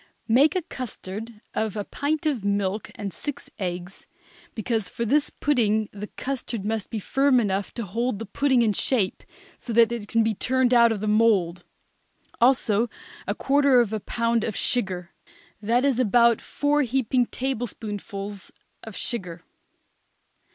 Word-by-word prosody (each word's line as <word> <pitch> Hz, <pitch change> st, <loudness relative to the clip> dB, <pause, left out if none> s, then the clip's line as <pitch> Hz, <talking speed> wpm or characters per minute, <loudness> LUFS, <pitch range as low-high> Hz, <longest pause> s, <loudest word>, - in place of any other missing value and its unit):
Make 275 Hz, +8 st, +4 dB
a 365 Hz, -, 0 dB
custard 225 Hz, -, -7 dB
of 220 Hz, -1 st, -2 dB
a 205 Hz, -, -1 dB
pint 295 Hz, +8 st, -2 dB
of 275 Hz, -9 st, 0 dB
milk 200 Hz, 0 st, -1 dB
and 200 Hz, -2 st, -5 dB
six 285 Hz, -1 st, -6 dB
eggs, 180 Hz, 0 st, -5 dB, 0.5 s
because 220 Hz, -3 st, -1 dB
for 235 Hz, -, -3 dB
this 290 Hz, +6 st, +2 dB
pudding 220 Hz, -7 st, +1 dB
the 210 Hz, +1 st, -7 dB
custard 245 Hz, -6 st, -4 dB
must 220 Hz, -1 st, -2 dB
be 225 Hz, -, -4 dB
firm 270 Hz, +5 st, +3 dB
enough 195 Hz, -3 st, -1 dB
to 235 Hz, -, -3 dB
hold 230 Hz, +4 st, -1 dB
the 225 Hz, -, -6 dB
pudding 260 Hz, +3 st, +2 dB
in 215 Hz, -2 st, +2 dB
shape 205 Hz, -4 st, +1 dB, 0.4 s
so 240 Hz, -, -6 dB
that 230 Hz, 0 st, +5 dB
it 230 Hz, -3 st, -4 dB
can 230 Hz, +1 st, +2 dB
be 220 Hz, 0 st, +1 dB
turned 255 Hz, +4 st, +1 dB
out 235 Hz, -1 st, +6 dB
of 210 Hz, -3 st, -2 dB
the 215 Hz, -, -2 dB
mould; 205 Hz, -5 st, +2 dB, 0.8 s
also 240 Hz, -3 st, +3 dB, 0.4 s
a -, -, -1 dB
quarter 280 Hz, -2 st, +4 dB
of 225 Hz, -3 st, +1 dB
a 215 Hz, -, -1 dB
pound 230 Hz, +2 st, 0 dB
of 215 Hz, -, -2 dB
sugar; 185 Hz, -7 st, -1 dB, 0.5 s
that 235 Hz, +5 st, +2 dB
is 265 Hz, -3 st, +2 dB
about 235 Hz, -1 st, +4 dB
four 295 Hz, +1 st, +1 dB
heaping 255 Hz, -1 st, +1 dB
tablespoonfuls 210 Hz, -6 st, -5 dB, 0.3 s
of 220 Hz, -2 st, -9 dB
sugar. 180 Hz, -8 st, -4 dB
230 Hz, 155 wpm, -25 LUFS, 205-255 Hz, 0.8 s, out